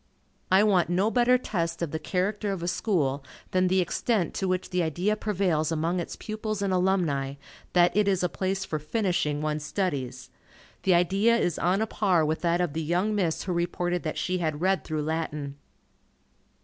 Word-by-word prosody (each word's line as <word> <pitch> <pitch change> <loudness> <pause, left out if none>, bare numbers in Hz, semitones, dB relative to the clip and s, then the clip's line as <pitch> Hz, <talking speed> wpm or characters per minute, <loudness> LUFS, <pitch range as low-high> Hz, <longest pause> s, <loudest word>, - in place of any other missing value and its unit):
I 190 +2 +6
want 185 -5 +3
no 190 +5 +2
better 250 +1 +4
test 170 -8 -2
of 160 - -3
the 160 - -3
character 200 +5 -1
of 185 -3 -4
a - - -2
school 150 -9 0 0.3
than 185 0 +3
the 185 +1 +3
extent 180 +1 0
to 190 - -2
which 185 0 -1
the 180 0 +1
idea 175 +6 0
prevails 180 -7 0
among 165 +3 0
its 170 - -5
pupils 215 -1 -4
and 195 -1 0
alumni, 170 -8 +1 0.4
that 175 0 +4
it 210 -1 +3
is 190 -2 +2
a - - +3
place 190 +2 -2
for 155 - -3
"finishing" 155 -3 -1
one's 155 -1 -1
studies. 135 -7 -3 0.5
The 185 -2 +3
idea 195 +7 +3
is 175 -8 0
on 185 +4 +2
a - - +2
par 190 -7 +2
with 155 +1 -1
that 170 0 +1
of 175 -5 -1
the 160 - -2
young 175 +7 0
Miss 180 -6 0
who 185 - -2
reported 175 0 -1
that 155 - -4
she 185 0 -1
had 155 -3 -1
read 185 -1 +1
through 155 -1 -3
Latin! 150 -3 -3
180 Hz, 190 wpm, -27 LUFS, 160-195 Hz, 0.5 s, I